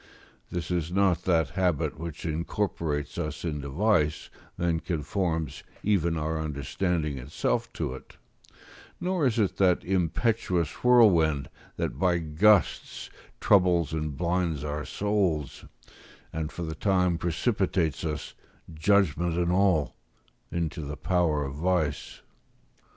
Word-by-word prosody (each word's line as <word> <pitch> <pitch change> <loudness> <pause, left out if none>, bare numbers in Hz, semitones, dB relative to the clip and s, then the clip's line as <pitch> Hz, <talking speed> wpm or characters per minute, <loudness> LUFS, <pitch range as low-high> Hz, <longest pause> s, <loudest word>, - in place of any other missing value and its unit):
This 85 0 -4
is 85 -2 -1
not 95 -3 +2
that 85 -3 +2
habit 90 -6 0
which 80 -2 -6
incorporates 80 -2 -2
us - - -4
into 75 -4 -3
vice, 75 -2 +1 0.3
and 85 -1 0
conforms 80 -2 -2 0.2
even 85 -5 +1
our 80 0 -2
understanding 75 0 -2
itself 65 +4 -2
to 65 - -3
it; 65 - -12 0.8
nor 180 -5 +1
is 120 -2 0
it 105 -4 +1
that 90 -3 +3
impetuous 90 -1 0
whirlwind 85 - +4 0.3
that - - -3
by 90 -2 +3
gusts 85 +6 +2 0.3
troubles 90 -6 +3
and 75 -3 -3
blinds 85 -3 0
our 75 0 -3
souls, 95 -8 -1 0.7
and 80 -1 -3
for 85 - -6
the 80 -1 -4
time 90 -1 +1
precipitates 85 - 0
us, 75 -3 -4 0.4
judgment 85 -1 +2
and 90 0 +1
all, 90 -5 +2 0.6
into 85 -1 -2
the 75 0 -6
power 80 -3 +1
of 70 - -5
vice. 80 -1 -1
85 Hz, 120 wpm, -27 LUFS, 75-95 Hz, 0.8 s, whirlwind